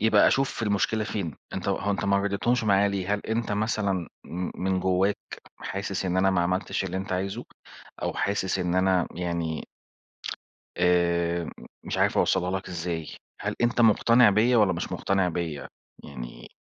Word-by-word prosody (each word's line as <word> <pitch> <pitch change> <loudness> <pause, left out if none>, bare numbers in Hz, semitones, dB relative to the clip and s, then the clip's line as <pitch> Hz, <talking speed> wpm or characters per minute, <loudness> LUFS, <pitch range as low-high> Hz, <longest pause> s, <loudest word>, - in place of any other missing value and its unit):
يبقى 110 -1 +5
أشوف 135 -3 +1
المشكلة 110 +1 +1
فين، 95 -8 -3 0.2
أنت - - -3
هو 100 - 0
أنت 100 - -1
ما 100 0 +3
رضيتهمش 100 +4 +1
معايا 100 0 +4
ليه؟ 100 0 -1
هل 105 - -3
أنت 110 -1 -2
مثلًا 100 -4 0 0.2
م 90 +1 -4
من 95 0 +1
جواك 95 +2 +2 0.4
حاسس 100 0 -3
إن 90 -1 0
أنا 95 +1 +4
ما 95 -2 +2
عملتش 90 +2 -1
اللي 95 0 -3
أنت 95 0 -4
عايزه، 100 +6 -2 0.6
أو - - 0
حاسس 100 -1 0
إن 90 -1 0
أنا 95 -1 +3
يعني 85 -2 -2 1.1
آآ 85 -1 +2 0.4
مش - - -3
عارف - - +2
أوصّلها 90 -1 +2
لك - - -11
إزاي 85 -2 -3 0.3
هل - - -2
أنت 120 0 +2
مُقتنع 115 +1 +6
بيا 115 +5 +4
والَّا 105 -4 +4
مش 85 - -4
مقتنع 95 -2 +1
بيا؟ 80 -4 -4 0.4
يعني - - -9
95 Hz, 160 wpm, -26 LUFS, 90-105 Hz, 1.1 s, مُقتنع